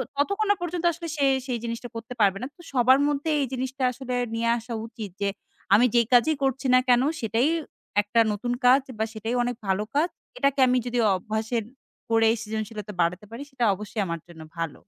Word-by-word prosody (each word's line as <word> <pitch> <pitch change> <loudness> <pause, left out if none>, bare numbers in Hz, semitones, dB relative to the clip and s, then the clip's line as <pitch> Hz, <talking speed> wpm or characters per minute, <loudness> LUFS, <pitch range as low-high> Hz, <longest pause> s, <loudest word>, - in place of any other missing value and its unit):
ততক্ষণ 400 +9 0
না - - +4
পর্যন্ত 350 0 -3
আসলে 335 +1 -7
সে 280 - +2 0.2
সেই 245 -2 -1
জিনিসটা 235 +1 -5
করতে 230 +2 -6
পারবে 195 -1 +4
না। - - -2
তো - - -14
সবার 260 +2 +5
মধ্যে 290 +2 -1
এই 275 - +1
জিনিসটা 260 +1 -3
আসলে 250 0 -5 0.2
নিয়ে 230 0 0
আসা 235 +1 -7
উচিত। 220 -5 -8
যে 200 - +2 0.5
আমি 235 +4 +5
যেই 235 -2 +4
কাজই 275 +6 +5
করছি 265 0 0
না 255 - +7
কেন। 245 0 +6 0.2
সেটাই 230 +6 +2 0.5
একটা 210 +3 +1
নতুন 240 +4 -2
কাজ 260 +2 +7 0.2
বা 220 - +2
সেটাই 225 +2 -3
অনেক 245 0 -2
ভালো 190 +2 +1
কাজ। 325 +4 +3 0.3
এটাকে 275 0 +1
আমি 250 0 +3
যদি 245 0 -1 0.2
অভ্যাসের 220 +4 -2 0.5
করেই 225 0 +4
সৃজনশীলতা 215 -1 -5
বাড়াতে 180 +4 0
পারি। 245 +5 -6
সেটা 245 -3 0
অবশ্যই 210 +2 -4
আমার 170 0 -3
জন্য 170 -2 -12 0.2
ভালো। 165 -3 -4
240 Hz, 195 wpm, -25 LUFS, 220-265 Hz, 0.5 s, না